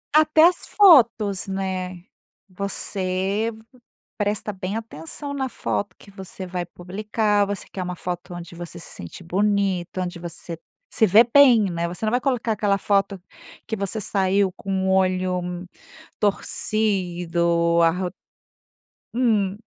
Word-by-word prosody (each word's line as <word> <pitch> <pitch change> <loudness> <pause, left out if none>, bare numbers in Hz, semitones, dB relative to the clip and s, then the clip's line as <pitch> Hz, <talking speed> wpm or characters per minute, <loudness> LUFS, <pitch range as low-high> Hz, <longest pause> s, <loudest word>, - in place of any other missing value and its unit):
Até 310 0 +5
as 350 0 +2
fotos, 230 - +5
né. 185 -2 -4 0.4
Você 195 +2 -2 0.7
presta 210 0 -1
bem 190 +1 -4
atenção 225 - -7
na 265 -2 -2
foto 205 -3 -3
que 200 - -16
você 190 -1 -8
vai 180 -1 -4
publicar, 205 +3 0
você 205 0 -4
quer 190 - -5
uma 180 0 -4
foto 180 0 -5
onde 175 -1 -9
você 175 0 -8
se - - -9
sente 85 - -9
bonito, 190 0 0
onde 175 -1 -4
você 170 0 -7 0.4
se 220 - +4
vê 210 +5 +7
bem, 245 -2 +6
né. 170 0 -2
Você 180 +5 -5
não 215 - +1
vai 245 +2 +1
colocar 250 -4 0
aquela 205 -1 +1
foto 195 0 0 0.5
que 220 - -2
você 200 +2 -3
saiu 195 -1 +1
com 190 0 -3
o - - +2
olho 185 -1 0 0.5
torcido, 175 -5 0
arr 180 +2 +1 1.1
Hum. 210 -6 +1
195 Hz, 135 wpm, -23 LUFS, 180-215 Hz, 1.1 s, vê